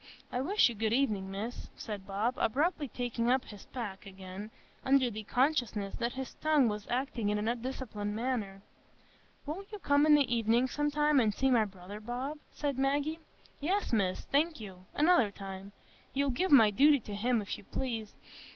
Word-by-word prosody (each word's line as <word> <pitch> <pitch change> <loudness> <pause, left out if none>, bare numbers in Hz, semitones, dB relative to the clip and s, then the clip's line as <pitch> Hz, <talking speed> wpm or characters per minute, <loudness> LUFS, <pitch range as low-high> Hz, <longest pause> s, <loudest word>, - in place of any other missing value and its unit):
I 250 - -1
wish 390 +10 +4
you 240 - -3
good 220 0 0
evenin', 215 -7 +1
Miss," 210 +5 -5
said 205 -4 -6
Bob, 205 +5 0
abruptly 290 +5 +1
taking 240 -1 -2
up 255 +1 +2
his 205 -2 -12
pack 210 -5 -6
again, 190 +2 -8 0.3
under 265 -2 +3
the 215 0 -5
consciousness 245 -4 0
that 235 0 -1
his 265 0 -6
tongue 305 -5 +3
was 210 -1 -3
acting 245 -4 -1
in 210 - +1
an 210 +1 -2
undisciplined 235 -4 -3
manner. 215 -5 -2 0.8
"Won't 375 +8 -6
you 420 - -5
come 290 -5 +3
in 300 - +8
the 275 -5 +2
evening 230 +2 +3
some 295 +3 0
time, 295 -1 +3
and 220 -4 +3
see 265 0 +2
my 230 -3 +4
brother, 195 +1 -9
Bob?" 250 +7 -4
said 280 -3 -2
Maggie. 285 +4 0 0.4
"Yes, 370 +1 -1
Miss, 190 -4 +1
thank 310 +2 +1
you—another 215 - +1
time. 195 0 -8 0.4
You'll 280 0 +2
give 365 +10 0
my 225 -7 +8
duty 285 +6 +5
to 210 - -8
him, 235 +4 +1
if 205 - -4
you - - -14
please. 225 -1 -4
240 Hz, 180 wpm, -31 LUFS, 210-280 Hz, 0.8 s, in